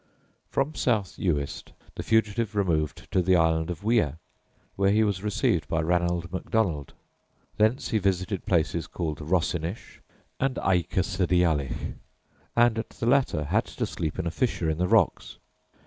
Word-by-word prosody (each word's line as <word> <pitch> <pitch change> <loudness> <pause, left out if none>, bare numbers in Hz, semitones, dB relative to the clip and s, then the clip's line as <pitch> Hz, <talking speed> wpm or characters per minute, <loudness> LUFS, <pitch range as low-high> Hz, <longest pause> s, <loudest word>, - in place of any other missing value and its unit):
From 135 +3 0
South 110 - 0
Uist 75 -6 -2 0.2
the - - -5
fugitive 110 -1 +1
removed 80 -7 0
to 95 - +3
the 90 +1 +3
Island 80 -1 +2
of 85 -3 -5
Wia, 105 - +1 0.6
where 100 0 +2
he 110 +2 +4
was 100 -3 0
received 105 -1 0
by 80 - 0
Ranald 85 +1 0
Macdonald; 90 -7 -1 0.6
thence 110 +5 +2
he 110 - +1
visited 95 0 -1
places 85 -2 +1
called 80 -4 -4
Rossinish 85 +3 -2 0.4
and 135 -1 0
Aikersideallich, 90 -4 0 0.6
and 120 -1 +4
at 115 - -5
the - - -6
latter 120 - +2
had 70 - +1
to - - -3
sleep 80 -2 -4
in 90 - -2
a 85 - -1
fissure 85 -7 0
in 80 - -4
the 90 - +2
rocks. 110 -4 +2
90 Hz, 145 wpm, -26 LUFS, 80-110 Hz, 0.6 s, he